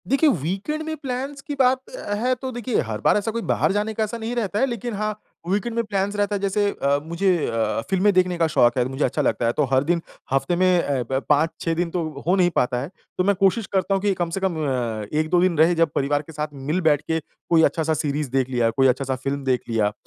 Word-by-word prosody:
देखिए 275 +4 +4
वीकेंड 195 - -2
में 315 0 -4
प्लान्स 275 +1 -4
की 290 - -5
बात 260 -1 +2
अ, - - -5
है 245 +5 +1
तो 260 +1 -6
देखिए 240 -1 -1
हर 110 -2 -5
बार - - +4
ऐसा 210 +2 -1
कोई 230 +1 -3
बाहर - - +2
जाने 210 +2 -1
का 220 - 0
ऐसा 215 +2 -3
नहीं 230 +2 -4
रहता 210 -3 -1
है, 265 - +4
लेकिन 240 -2 -4
हाँ, 215 +1 -3 0.3
वीकेंड 205 +4 -1
में 235 - +1
प्लान्स 200 -1 -1
रहता 205 0 0
है - - -1
जैसे 200 +1 0 0.3
मुझे 180 +3 +2
अ, 110 -1 -1
फिल्में 195 +2 +3
देखने 180 -1 +2
का 165 -1 +2
शौक 120 -5 +3
है 125 - +2
मुझे 135 +3 -2
अच्छा 150 - -1
लगता 125 -3 0
है 115 - +3
तो 150 - +3
हर 130 +1 +4
दिन 170 +3 +1 0.3
हफ्ते 135 +5 +1
में 180 -1 +3
अ, 135 -3 -1
ब 130 - +2
5-6 160 +2 +1
दिन 170 +1 -1
तो 175 -1 -1 0.2
हो 180 - +4
नहीं 180 -2 +4
पाता 125 0 +1
है, 140 - -5 0.3
तो 185 - +2
मैं 200 +1 +3
कोशिश 195 +3 +2
करता 190 0 +1
हूँ 195 - +1
कि 205 0 +2
कम 175 -2 -2
से 170 - -3
कम 190 -3 -1
अ, 120 -5 -2
1-2 155 +3 +2
दिन 180 -3 +2
रहे 165 +3 +5
जब 165 -1 +3
परिवार 145 +1 +1
के 155 - -13
साथ 150 0 -2 0.2
मिल-बैठ 160 -4 +2
के 160 +1 -1 0.3
कोई 165 -1 +5
अच्छा-सा 160 -1 +1
सीरीज़ 150 -2 -2
देख 130 -1 +1
लिया, 120 -3 +2
कोई 135 +4 +3
अच्छा-सा 130 +1 0
फ़िल्म 135 +2 -3
देख 130 -2 +1
लिया 110 -2 +2
अ, 105 - -3
175 Hz, 250 wpm, -23 LUFS, 140-210 Hz, 0.3 s, रहे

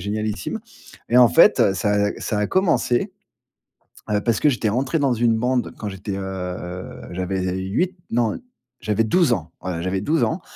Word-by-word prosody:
génialissime, 105 - -3 0.5
et 120 - +2
en 125 -1 +8
fait, 95 - +5
ça 105 +1 0
a 100 0 +2
ça 105 - -2
a 105 - +1
commencé, 175 - +1 1.0
heu, 105 - +2
parce 115 0 +1
que 150 - +4
j'étais 120 -5 0
rentré 130 +8 0
dans 140 -3 +2
une 115 -1 +2
bande 125 +1 0
quand 105 - -4
j'étais, 95 0 -5
heu, 90 -2 -6
j'avais 95 +1 -2 0.2
8 175 - -1 0.2
non, 115 -2 +1 0.4
j'avais 105 +1 +1
12 170 +5 +3
ans, 85 -5 -4
voilà 90 -3 -4
j'avais 95 +2 -1
12 155 +9 +1
ans. 165 +3 -1
105 Hz, 170 wpm, -22 LUFS, 95-125 Hz, 1.0 s, en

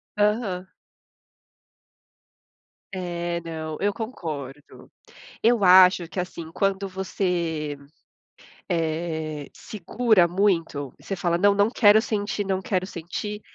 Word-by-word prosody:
Aham. 205 -3 0 2.3
É, 175 -2 -3
não. 160 -2 -6
Eu 205 +1 +1
concordo. 150 - -7 0.5
Eu 230 -2 +3
acho 185 -1 +7
que, 185 - -5
assim, 170 -2 -6
quando 195 +2 0
você, 175 -5 -2 0.9
eh, 160 -3 -2
segura 215 -1 +1
muito, 170 -7 0
você 195 - -4
fala: 175 -2 0
"Não, 200 +2 +4
não 205 +2 +3
quero 215 -3 +5
sentir, 205 -2 -2
não 190 -1 -1
quero 185 -1 -1
sentir." 195 +4 -5
180 Hz, 100 wpm, -24 LUFS, 165-205 Hz, 2.3 s, acho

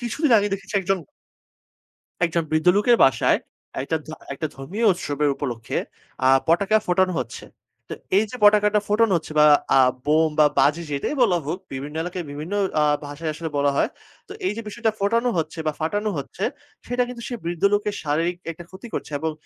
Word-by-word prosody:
কিছুদিন 245 +4 0
আগে 205 0 0
দেখেছি 200 +2 -5
একজন 195 +1 0 1.3
একজন 170 0 -1
বৃদ্ধ 155 +2 +1
লোকের 235 +4 +4
বাসায় 130 -4 +3 0.4
একটা 160 +4 -1
ধ - - -10 0.2
একটা 155 +3 -3
ধর্মীয় 185 +13 -3
উৎসবের 150 -4 -1
উপলক্ষে, 120 -5 -4 0.5
আ - - +6 0.2
পটকা 195 +6 +3
ফোটানো 185 +1 +2
হচ্ছে। 120 -2 -6 0.4
তো - - -3 0.2
এইযে 215 +3 0
পটকাটা 210 0 +5
ফোটানো 215 0 +3
হচ্ছে 160 -1 -8
বা 150 - +7 0.3
আ - - +6 0.3
বোম 155 +2 +3
বা 150 - +7
বাজি 150 +5 +3
যেটাই 140 - -2
বলা 195 -8 +4
হোক, 165 +6 -3
বিভিন্ন 140 +3 -6
এলাকায় 180 0 -5
বিভিন্ন 150 +6 -6 0.3
আ - - +4 0.2
ভাষায় 150 +2 -4
আসলে 160 +1 -5
বলা 140 0 +2
হয়। - - +2 0.4
তো - - -8
এইযে 220 +2 -2
বিষয়টা 225 +1 -1
ফোটানো 230 +5 +1
হচ্ছে 165 +1 -3
বা - - +2
ফাটানো 205 +7 -1
হচ্ছে, 140 +7 -6 0.4
সেটা 245 +1 +1
কিন্তু 245 -1 -8
সে 245 - -4
বৃদ্ধ 170 0 -4
লোকের 205 0 0
শারীরিক 165 +4 0
একটা 165 +1 -11
ক্ষতি 190 +5 -11
করছে। - - -4
এবং 160 +1 -1
175 Hz, 175 wpm, -23 LUFS, 150-210 Hz, 1.3 s, বা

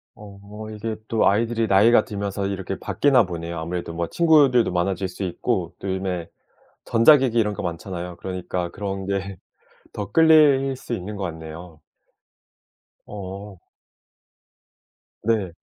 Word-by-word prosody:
어 100 -1 -12 0.3
이게 110 +1 -4
또 115 - +2
아이들이 115 +2 0
나이가 110 +3 +5
들면서 100 -1 -3
이렇게 95 -1 -4
바뀌나 130 -6 +3
보네요. 85 -1 -5
아무래도 85 +1 -4
뭐 85 0 -2
친구들도 145 - +4
많아질 90 +1 -1
수 95 +2 -7
있고, 90 - -2
또 100 - -6
요즘에 95 -3 -3 0.6
전자기기 125 0 +5
이런 105 -2 +1
거 - - -6
많잖아요. 90 0 -5
그러니까 90 -1 -4
그런 95 -1 -4
게 100 -1 -3 0.5
더 100 -1 -6
끌릴 150 -4 +5
수 125 - -7
있는 105 -1 -5
것 100 - -5
같네요. 80 -1 -8 1.3
어 100 -1 -8 1.6
네. 105 -5 0
100 Hz, 275 characters per minute, -23 LUFS, 90-115 Hz, 1.6 s, 나이가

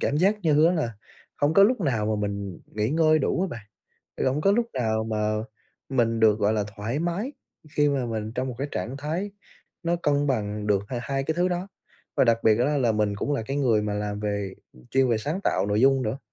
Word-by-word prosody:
cảm 145 - 0
giác 200 +5 +2
như 155 -2 +4
á 175 - +4
là 150 -10 -1 0.4
hổng 145 +2 +1
có 195 - +7
lúc 230 +1 +4
nào 115 - 0
mà 110 0 0
mình 100 -3 -5
nghỉ 105 0 -2
ngơi 155 0 +4
đủ 165 +4 0
á 195 - +1
bạn, 115 -7 -8 0.6
hổng 135 +3 0
có 195 +5 +4
lúc 235 +2 +2
nào 110 -3 0
mà 110 -1 -1 0.5
mình 115 -4 +1
được, 110 -1 +5
gọi 105 0 +2
là, 105 -2 0
thoải 110 +7 -2
mái, 175 - -2 0.4
khi 145 0 +4
mà 135 -3 0
mình 110 -1 -4
trong 130 +1 -1
một 125 - -4
cái 140 - -2
trạng 115 +9 -4
thái 160 +8 -3 0.5
nó 170 0 +1
cân 145 -3 +1
bằng 105 -5 -1
được 100 -2 +2
h - - -3
hai 135 +3 -2
cái 160 - -1
thứ 175 +2 +2
đó. 180 +2 -3 0.5
Và - - +5
đặc 115 -2 +3
biệt 110 0 +5
á 145 +4 +2
là 120 -4 +2
mình 105 -1 +1
cũng 145 - -2
là 135 - -1
cái 135 +5 -4
người 120 -7 +2
mà 105 -1 -2
làm 105 0 -3
về 100 -2 -2 0.4
chuyên 135 -1 +3
về 115 - +2
sáng 150 - -3
tạo - - +1
nội 105 +1 +1
dung 135 +1 +4
nữa, 115 +3 -2
125 Hz, 235 wpm, -25 LUFS, 110-150 Hz, 0.6 s, có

